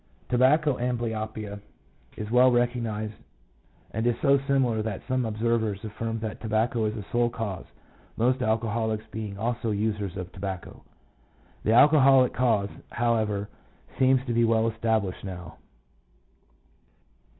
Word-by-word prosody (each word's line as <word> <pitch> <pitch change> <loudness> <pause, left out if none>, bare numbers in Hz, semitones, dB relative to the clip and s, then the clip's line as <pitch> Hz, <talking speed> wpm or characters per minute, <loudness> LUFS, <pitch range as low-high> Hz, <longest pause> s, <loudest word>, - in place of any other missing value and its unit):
Tobacco 135 +3 +3
amblyopia 110 -4 -3 0.6
is 105 0 -5
well 125 +1 +6
recognized, 115 -3 -1 0.8
and 110 +2 -1
is 120 - +2
so 140 0 +4
similar 130 -5 +2
that 105 -3 -4
some 130 -1 0
observers 110 -2 -1
affirm 115 +1 -4
that 110 -1 -5
tobacco 110 +1 0
is 105 0 -1
the 105 -3 -6
sole 120 0 +2
cause, 110 -6 -5 0.5
most 125 +3 +2
alcoholics 110 -1 0
being 105 -3 -5
also 115 +2 -2
users 105 -2 -2
of 90 0 -6
tobacco. 95 -2 -6 0.8
The 110 - +2
alcoholic 135 -1 +6
cause, 110 -5 +1 0.2
however, 110 -4 0 0.5
seems 130 0 +4
to 120 - -2
be 120 0 +3
well 115 0 +3
established 110 -4 -1
now. 90 -3 -8
115 Hz, 125 wpm, -26 LUFS, 105-120 Hz, 0.8 s, well